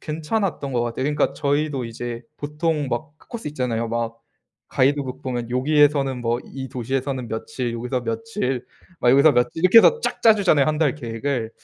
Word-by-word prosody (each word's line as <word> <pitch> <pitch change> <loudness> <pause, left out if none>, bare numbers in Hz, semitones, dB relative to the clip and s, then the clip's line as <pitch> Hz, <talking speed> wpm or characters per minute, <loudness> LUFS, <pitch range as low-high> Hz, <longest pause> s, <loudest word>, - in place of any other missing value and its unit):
괜찮았던 160 -1 -2
것 120 - +1
같아요. 120 +2 -3
그러니까 150 +1 +1
저희도 145 -2 -1
이제 115 +1 -6
보통 150 0 -2
막 130 +5 -3
그 - - -24
코스 235 -10 -5
있잖아요. 125 -5 -2
막 115 0 -3 0.5
가이드북 135 0 0
보면 120 -3 -4
요기에서는 140 0 +2
뭐 120 +1 -1
이 135 -1 -7
도시에서는 130 0 -3
며칠 120 +2 -4
여기서 125 +2 -3
며칠 210 - -2 0.4
막 120 - +4
여기서 140 +4 +6
며칠 125 +5 +2
이렇게 185 +5 +8
해서 465 - +5
쫙 - - -3
짜 225 -1 +7
주잖아요, 175 -9 +3
1 155 -1 0
달 150 -5 +2
계획을. 120 -2 -3
135 Hz, 380 characters per minute, -22 LUFS, 120-150 Hz, 0.5 s, 이렇게